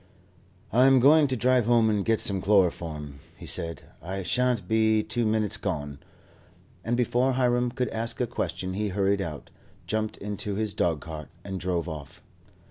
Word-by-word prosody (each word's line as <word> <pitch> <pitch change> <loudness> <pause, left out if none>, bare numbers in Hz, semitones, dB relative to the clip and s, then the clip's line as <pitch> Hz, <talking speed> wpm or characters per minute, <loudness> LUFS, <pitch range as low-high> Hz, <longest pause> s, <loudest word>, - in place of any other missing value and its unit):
"I 125 +3 +6
am 135 -1 +6
going 145 +4 +6
to 130 - -1
drive 125 -1 +2
home 120 -2 +4
and 105 -2 +1
get 115 +1 +1
some 95 -2 +3
chloroform," 85 -7 0 0.2
he - - -10
said, 85 0 -2 0.2
"I 95 +4 -5
shan't 115 +2 0
be 110 0 +2
two 120 0 -1
minutes 110 0 0
gone;" 75 -8 -4 0.8
and 120 +2 -1
before 125 +2 +1
Hiram 125 -1 +1
could 125 -1 -2
ask 115 +1 -1
a 125 - +2
question 95 -5 -4
he 105 +2 -1
hurried 100 0 +1
out, 80 -5 -6 0.3
jumped 110 0 -2
into 105 0 -4
his 105 -1 -2
dogcart, 80 -2 -2
and 95 -1 -5
drove 90 -2 -2
off. 75 -4 -8
105 Hz, 165 wpm, -26 LUFS, 90-120 Hz, 0.8 s, I